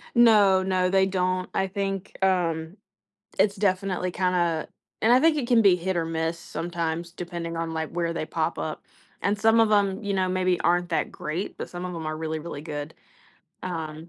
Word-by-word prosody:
No, 205 Hz, -5 st, +6 dB
no, 185 Hz, -1 st, +1 dB
they 190 Hz, 0 st, +4 dB
don't. 185 Hz, -1 st, -1 dB
I 190 Hz, -, +1 dB
think, 195 Hz, 0 st, -4 dB
um, 170 Hz, -1 st, 0 dB, 0.6 s
it's 200 Hz, 0 st, +3 dB
definitely 185 Hz, -2 st, 0 dB
kinda 175 Hz, -3 st, 0 dB, 0.3 s
and 230 Hz, +2 st, +5 dB
I 255 Hz, -, +6 dB
think 320 Hz, 0 st, +4 dB
it 260 Hz, -5 st, -1 dB
can 235 Hz, -2 st, +5 dB
be 195 Hz, -4 st, +6 dB
hit 185 Hz, +1 st, -2 dB
or 165 Hz, -1 st, 0 dB
miss 165 Hz, +1 st, -2 dB
sometimes 170 Hz, -1 st, -4 dB
depending 170 Hz, -2 st, -5 dB
on, 165 Hz, -1 st, -3 dB
like, 160 Hz, -1 st, -3 dB
where 170 Hz, -1 st, -2 dB
they -, -, -2 dB
pop -, -, -2 dB
up, -, -, -4 dB, 0.4 s
and 205 Hz, +1 st, 0 dB
some 225 Hz, +2 st, +4 dB
of 220 Hz, -1 st, +4 dB
'em, 200 Hz, -1 st, +2 dB
you 200 Hz, -1 st, -2 dB
know, 185 Hz, -1 st, +1 dB
maybe 185 Hz, -1 st, +1 dB
aren't 175 Hz, 0 st, +2 dB
that 165 Hz, -, -1 dB
great, 165 Hz, +6 st, -4 dB
but -, -, -5 dB
some 175 Hz, 0 st, -6 dB
of 180 Hz, -1 st, -4 dB
'em 160 Hz, -2 st, -5 dB
are 155 Hz, 0 st, -3 dB
really, 160 Hz, 0 st, -3 dB
really 150 Hz, -2 st, -7 dB
good. 145 Hz, -2 st, -6 dB, 0.7 s
Um 160 Hz, -1 st, -5 dB
180 Hz, 195 wpm, -26 LUFS, 165-195 Hz, 0.7 s, No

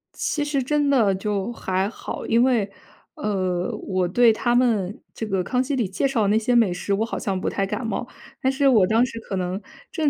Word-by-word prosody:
其 295 Hz, -1 st, -1 dB
实 280 Hz, -3 st, 0 dB
真 290 Hz, +2 st, +1 dB
的 230 Hz, -8 st, +4 dB
就 200 Hz, +2 st, -2 dB
还 190 Hz, -3 st, -1 dB
好， -, -, -7 dB
因 230 Hz, +1 st, +3 dB
为， 230 Hz, -6 st, +2 dB, 0.5 s
呃， 185 Hz, -4 st, -1 dB
我 185 Hz, -2 st, 0 dB
对 235 Hz, +5 st, +5 dB
他 240 Hz, +2 st, 0 dB
们 220 Hz, -6 st, +1 dB, 0.2 s
这 225 Hz, -, -5 dB
个 195 Hz, -3 st, 0 dB
《康 250 Hz, +6 st, 0 dB
熙》 275 Hz, +2 st, -2 dB
里 225 Hz, -7 st, 0 dB
介 235 Hz, +8 st, 0 dB
绍 255 Hz, -5 st, 0 dB
的 -, -, +2 dB
那 215 Hz, -, +3 dB
些 240 Hz, +2 st, +1 dB
美 225 Hz, -6 st, +4 dB
食， 200 Hz, +2 st, -2 dB
我 220 Hz, +3 st, +1 dB
好 -, -, -4 dB
像 195 Hz, -2 st, -2 dB
不 -, -, -1 dB
太 195 Hz, -, -1 dB
感 225 Hz, +4 st, -4 dB
冒。 240 Hz, +2 st, -3 dB, 0.3 s
但 265 Hz, -, +2 dB
是 275 Hz, +1 st, 0 dB
我 210 Hz, -7 st, +5 dB
当 230 Hz, +3 st, +3 dB
时 230 Hz, -2 st, -7 dB
可 200 Hz, -, -6 dB
能 185 Hz, +2 st, -2 dB, 0.3 s
正 310 Hz, -3 st, +1 dB
220 Hz, 245 characters per minute, -23 LUFS, 195-250 Hz, 0.5 s, 对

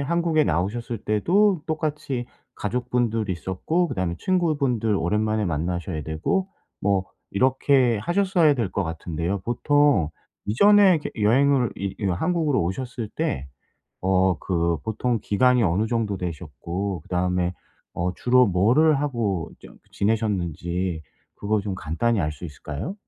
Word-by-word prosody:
한국에 165 Hz, +1 st, +1 dB
나오셨을 115 Hz, +5 st, -1 dB
때도 175 Hz, -, +2 dB
똑같이 150 Hz, -5 st, -3 dB, 0.3 s
가족분들 120 Hz, -1 st, -1 dB
있었고 95 Hz, -, -1 dB
그다음에 90 Hz, -, -2 dB
친구분들 145 Hz, -, +1 dB
오랜만에 105 Hz, +4 st, 0 dB
만나셔야 85 Hz, -1 st, -2 dB
되고 80 Hz, -, -1 dB, 0.3 s
뭐 95 Hz, -1 st, +1 dB, 0.3 s
이렇게 130 Hz, 0 st, +3 dB
하셨어야 175 Hz, -, +2 dB
될 115 Hz, -7 st, -2 dB
것 100 Hz, -, 0 dB
같은데요. 85 Hz, +3 st, -3 dB
보통 120 Hz, -, +2 dB, 0.4 s
이전에 200 Hz, -, +6 dB
이렇게 -, -, -4 dB
여행을 130 Hz, +2 st, +3 dB
이 100 Hz, -1 st, -4 dB
이런 95 Hz, -4 st, 0 dB
한국으로 160 Hz, -, +1 dB
오셨을 115 Hz, +4 st, -4 dB
때 70 Hz, +1 st, -3 dB, 0.6 s
어 95 Hz, -2 st, +2 dB
그 85 Hz, -2 st, 0 dB
보통 115 Hz, +1 st, -1 dB
기간이 125 Hz, +3 st, +3 dB
어느 95 Hz, +4 st, +1 dB
정도 110 Hz, -4 st, -1 dB
되셨고 90 Hz, +2 st, -4 dB
그다음에 90 Hz, 0 st, 0 dB, 0.4 s
어 90 Hz, +1 st, -2 dB
주로 125 Hz, 0 st, +4 dB
뭐를 125 Hz, -, +3 dB
하고 110 Hz, -, -1 dB
좀 -, -, -14 dB
그 -, -, -33 dB
지내셨는지 90 Hz, -5 st, -1 dB, 0.3 s
그거 105 Hz, 0 st, 0 dB
좀 100 Hz, -1 st, -4 dB
간단히 95 Hz, +7 st, -1 dB
알 75 Hz, -1 st, -1 dB
수 80 Hz, -, -10 dB
있을까요? 75 Hz, -, -6 dB
105 Hz, 305 characters per minute, -24 LUFS, 90-130 Hz, 0.6 s, 이전에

